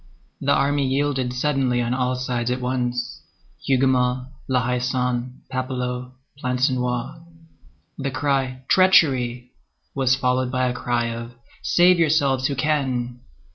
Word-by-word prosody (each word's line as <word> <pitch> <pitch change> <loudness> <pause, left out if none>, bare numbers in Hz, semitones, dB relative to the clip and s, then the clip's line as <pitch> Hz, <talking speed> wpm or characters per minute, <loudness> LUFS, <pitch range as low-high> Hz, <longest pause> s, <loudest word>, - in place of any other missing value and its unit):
The 140 - 0
army 140 0 +2
yielded 135 -2 0
suddenly 130 -1 0
on 120 0 0
all 130 0 0
sides 125 -1 -2
at 125 +1 -1
once,—Hougomont, 125 - -1 0.2
La 125 -2 +1
Haie 125 -1 0
Sainte, 125 0 -2
Papelotte, 125 -1 -3 0.3
Plancenoit. 125 +2 -1 0.8
The 140 0 -1
cry 135 -2 -1
"Treachery!" 130 -10 +3 0.4
was 130 -2 +2
followed 125 -1 0
by 130 -1 +1
a 125 - -1
cry 120 -1 -1
of 115 +1 -7 0.3
"Save 180 0 +4
yourselves 140 -5 +2
who 140 - -2
can!" 130 -4 -1
130 Hz, 120 wpm, -23 LUFS, 125-135 Hz, 0.8 s, Save